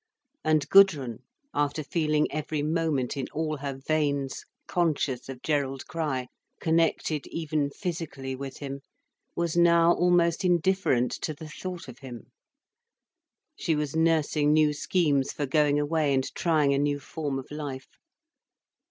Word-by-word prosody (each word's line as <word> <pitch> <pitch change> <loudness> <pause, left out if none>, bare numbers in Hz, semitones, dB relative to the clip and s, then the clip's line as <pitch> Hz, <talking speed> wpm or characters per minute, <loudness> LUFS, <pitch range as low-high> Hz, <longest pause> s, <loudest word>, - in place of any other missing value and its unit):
And 155 -2 +2
Gudrun, 150 - +5 0.3
after 145 +1 0
feeling 150 0 +1
every 150 0 -2
moment 155 -5 0
in 135 -2 -3
all 155 -1 -2
her 140 -1 -5
veins 140 -3 0 0.2
conscious 150 -7 -1
of 130 -2 -8
Gerald 140 -3 -1
Crich, 150 -6 -2 0.3
connected 160 -2 +1
even 155 -3 -1
physically 155 -6 -5
with 135 0 -7
him, 140 -1 -6 0.6
was 170 -1 -1
now 170 0 +5
almost 175 0 +2
indifferent 175 -8 +2
to 155 - -3
the 155 +2 -9
thought 180 +2 -7
of 125 0 -11
him. 125 -4 -10 1.2
She 160 - 0
was 150 -1 -2
nursing 160 -2 +2
new 155 -1 +4
schemes 145 -3 +1
for 145 - -3
going 145 +1 +2
away 150 -1 +1
and 130 0 +1
trying 155 -5 +2
a 140 - +1
new 145 0 0
form 145 -1 -4
of 135 - -8
life. 145 -3 -7
150 Hz, 135 wpm, -27 LUFS, 140-165 Hz, 1.2 s, Gudrun